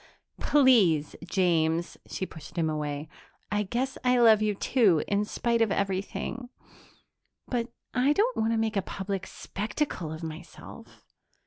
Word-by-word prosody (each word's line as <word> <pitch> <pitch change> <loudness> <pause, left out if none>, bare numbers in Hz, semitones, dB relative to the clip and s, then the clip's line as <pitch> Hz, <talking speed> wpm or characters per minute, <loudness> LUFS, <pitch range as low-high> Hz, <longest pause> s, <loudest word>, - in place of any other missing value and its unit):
"Please, 215 - +4
James." 170 -2 +1
She 190 - -3
pushed 160 -4 -12
him 160 -2 +1
away. 150 0 -3 0.4
"I 210 0 +1
guess 245 +6 -2
I 250 0 +3
love 225 -3 +6
you, 210 -1 +1
too, 200 - +3
in 205 +1 +1
spite 235 +2 0
of 225 -3 +3
everything... 200 +6 -2 1.0
but 240 -1 -2 0.2
I 260 +3 +3
don't 455 +8 +1
want 220 +1 +1
to 230 - +1
make 220 -1 0
a 195 - +2
public 195 0 -4
spectacle 210 - -4
of 160 +1 -7
myself." 160 -1 -10
205 Hz, 140 wpm, -28 LUFS, 170-235 Hz, 1.0 s, love